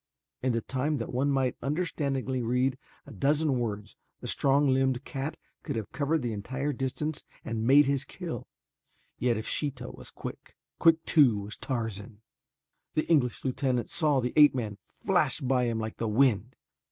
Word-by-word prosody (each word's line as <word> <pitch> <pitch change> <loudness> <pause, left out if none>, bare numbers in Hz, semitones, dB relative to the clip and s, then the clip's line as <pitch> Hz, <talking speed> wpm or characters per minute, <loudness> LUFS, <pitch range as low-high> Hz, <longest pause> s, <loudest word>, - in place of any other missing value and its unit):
In 130 -1 +1
the 115 - 0
time 140 +6 -1
that 115 - -5
one 135 +3 +1
might 135 -3 +1
understandingly 140 -3 -1
read 125 +2 +1 0.3
a 140 - -11
dozen 140 +4 +1
words 105 -3 -4 0.2
the - - -10
strong 140 +1 +2
limbed 130 -1 +2
cat 140 +3 -4 0.2
could - - -4
have 110 -2 -4
covered 150 0 0
the 120 -2 -1
entire 130 +8 -3
distance 140 +4 -3 0.2
and 115 0 -2
made 145 +3 +7
his 140 0 +1
kill, 160 - -6 0.7
yet 120 -2 +2
if 110 - -5
Sheeta 130 -5 -2
was - - -9
quick, - - -9 0.2
quick 165 -1 +4
too 125 -10 +5
was 105 +1 -6
Tarzan. 110 -4 -4 0.7
The 155 - +1
English 130 -7 +2
lieutenant 130 -2 0
saw 150 -5 +2
the 125 -1 -2
ape 150 -3 +7
man 105 -5 -3 0.3
flash - - +2
by 125 -1 +1
him 115 -1 -1
like 110 0 -4
the 115 - -1
wind. 120 +1 +2
130 Hz, 165 wpm, -29 LUFS, 115-140 Hz, 0.7 s, made